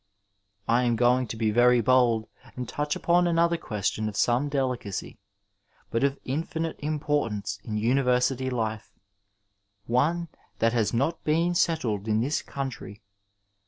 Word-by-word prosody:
^ - - -49 0.6
I 120 +2 +3
am 120 -2 +2
going 125 +2 +3
to 110 - -6
be 110 -1 +1
very 120 +2 +5
bold 120 -2 +3 0.3
and 125 -1 -5
touch 150 +3 -2
upon 175 +1 +2
another 170 0 +2
ques 105 - -2
tion 110 0 -3
of 105 - -9
some 125 +4 +2
delicacy, 130 -8 -3 0.7
but 115 - 0
of 140 0 +1
infinite 160 +4 -3
importance 145 -10 -2
in 110 - -5
univer 125 +3 +2
sity 130 +1 0
life: 110 -3 -3 0.9
one 160 +8 +1 0.3
that 115 +1 +2
has 115 -3 +1
not 140 +8 -1
been 165 +3 +1
settled 120 - 0
in 110 0 +2
this 140 +7 0
country. 130 -7 -6
125 Hz, 150 wpm, -26 LUFS, 115-145 Hz, 0.9 s, very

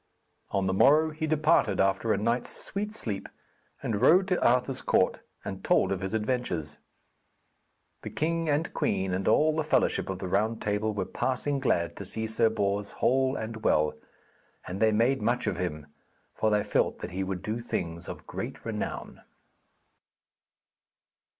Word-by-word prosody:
On 95 -1 0
the 95 - +1
morrow 155 +10 +5
he 155 +1 -3
departed 155 -10 +3
after 95 +3 +2
a - - +2
night's 115 +4 0
sweet 210 +2 -4
sleep, 105 - -4 0.5
and 105 -2 -1
rode 185 +3 +6
to 180 - +1
Arthur's 125 +2 +2
court - - +2 0.3
and - - -6
told - - +3
of 95 - -1
his 95 +3 -2
adventures. 105 - -2 1.2
The - - -6
king 165 +1 -1
and 150 +3 0
queen 95 -2 0
and 95 +1 -2
all 155 0 +4
the 160 - 0
fellowship 150 - +1
of 95 - -2
the 95 - -5
Round 110 +5 +1
Table 105 +1 0
were 100 -3 -2
passing 135 +6 -1
glad 85 -10 0
to 100 - -6
see 110 +3 -3
Sir 110 +1 +2
Bors 100 -1 -1
whole 130 +1 +2
and 110 -2 -5
well, 75 0 +3 0.7
and 90 +2 -5
they 110 0 +4
made 115 +4 +2
much 120 +3 0
of - - -1
him, 75 -5 -3 0.5
for 110 - +1
they 105 -1 +2
felt - - +1
that - - -5
he 95 +2 -2
would 95 -1 -4
do 110 +2 -2
things 85 -8 -4
of - - -8
great - - -6
renown. - - -4
110 Hz, 165 wpm, -28 LUFS, 95-135 Hz, 1.2 s, rode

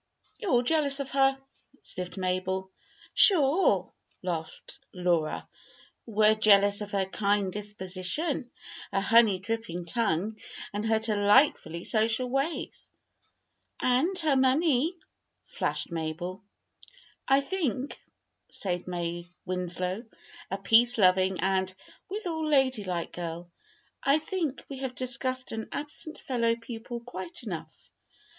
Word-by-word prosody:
"You're 420 - -3
all 245 -5 +4
jealous 285 0 +2
of 275 -1 -4
her," 270 0 +3 0.5
sniffed 180 +1 -5
Mabel. 190 +1 -2 0.4
"Sure!" 290 - +6 0.3
laughed 165 -3 -5
Laura. 175 -4 0 0.6
"We're 215 -1 +4
jealous 205 -1 +4
of 205 - -5
her 195 -1 +1
kind 200 0 0
disposition, 205 - -3 0.4
her 195 - +1
honey 220 -1 +5
dripping 200 -3 -4
tongue, 215 +1 -1 0.3
and 210 +2 -2
her 220 0 +3
delightfully 210 - +3
social 225 +3 +1
ways." 275 +5 -3 0.9
"And 275 +10 +2
her 305 -3 +3
money!" 280 +4 +2 0.5
flashed - - -3
Mabel. 170 +3 -4 0.8
"I 270 +1 +5
think," 280 - -3 0.5
said 180 -2 -2
May 175 -1 -4 0.2
Winslow, 180 +2 -2 0.5
a 195 - -2
peace 235 +4 +5
loving 185 -2 +3
and, 190 0 +1 0.4
withal, 345 -6 -3
ladylike 225 - +1
girl 170 0 -6 0.5
"I 275 +2 +4
think 315 -3 -3
we 275 -2 -7
have 260 -2 -4
discussed 255 0 -2
an 220 0 -5
absent 300 +2 -5
fellow 235 -3 0
pupil 235 0 -7
quite 190 -5 -6
enough. 185 -8 -5
215 Hz, 110 wpm, -28 LUFS, 185-265 Hz, 0.9 s, Sure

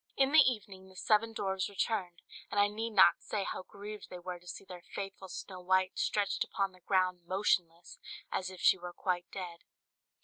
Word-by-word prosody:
"] - - -44
In 270 0 +4
the 315 - +8
evening 205 -8 +1
the 190 - -17
seven 215 +4 +2
dwarfs 190 -3 -1
returned; 190 -3 -2 0.3
and 205 - 0
I 205 - +6
need 220 +2 -3
not 190 -5 +6
say 205 -2 -2
how - - -4
grieved 205 +2 -9
they 180 - -7
were 180 0 -6
to 180 - -20
see 185 - -7
their 180 -2 -9
faithful 195 -1 -5
Snow 185 0 -7
White 185 +1 +2
stretched 205 -1 +1
upon 195 -2 -1
the 185 - -19
ground 185 -1 +1
motionless, 175 -3 0 0.3
as 185 - -1
if 185 -1 -10
she 190 - +5
were 175 0 -7
quite 175 -1 -1
dead. 175 -3 -6
190 Hz, 200 wpm, -33 LUFS, 180-205 Hz, 0.3 s, the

